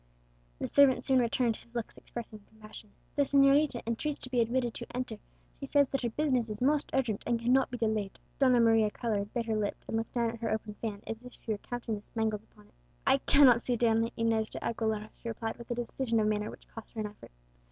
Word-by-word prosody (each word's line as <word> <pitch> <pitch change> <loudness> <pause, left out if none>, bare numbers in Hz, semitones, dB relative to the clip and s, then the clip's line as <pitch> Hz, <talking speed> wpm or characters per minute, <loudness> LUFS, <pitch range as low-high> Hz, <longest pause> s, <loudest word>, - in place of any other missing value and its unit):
The - - -3
servant 265 -3 +5
soon 265 -2 +4
returned, 235 -1 +1
his - - -16
looks 235 -2 -4
expressing 225 -2 -8
compassion. 215 0 -13 0.3
"The 290 - +3
señorita 275 -1 +4
entreats 255 +6 -2
to 255 - -4
be 250 - +2
admitted 240 0 0
to 235 - -6
enter; 240 -4 -4 0.4
she 275 - -5
says 285 -1 +3
that 275 - -1
her 240 - 0
business 255 -3 0
is 210 0 -4
most 290 +3 +2
urgent, 240 -6 0
and 235 -1 +1
cannot 250 +3 +3
be 245 - -5
delayed." 215 -4 -1 0.2
Donna 255 -3 +5
Maria 225 -2 +4
coloured, 210 -2 -2
bit 235 -2 -2
her 225 -1 0
lip, 210 -1 -1
and 225 - -1
looked 225 0 -4
down 235 -1 +1
at 230 - -9
her 225 -1 -2
open 215 -1 -2
fan, 210 -3 -4
as 225 +1 -5
if 250 0 -11
she 225 - -6
were 210 - -1
counting 235 -2 -4
the - - -10
spangles 220 -2 -2
upon 210 -1 -22
it. - - -26 0.3
"I 270 0 +5
cannot 260 -4 +6
see 245 - 0
Donna 225 -1 +2
Inez 225 -1 +1
de - - -7
Aguilera," 220 -2 -2
she 230 - -6
replied, 225 0 -4
with 235 - -11
a 240 - -1
decision 240 0 -1
of 215 - +2
manner 210 0 0
which - - -12
cost 225 - -10
her - - -4
an - - -2
effort. 210 0 -10
230 Hz, 235 wpm, -30 LUFS, 220-250 Hz, 0.4 s, cannot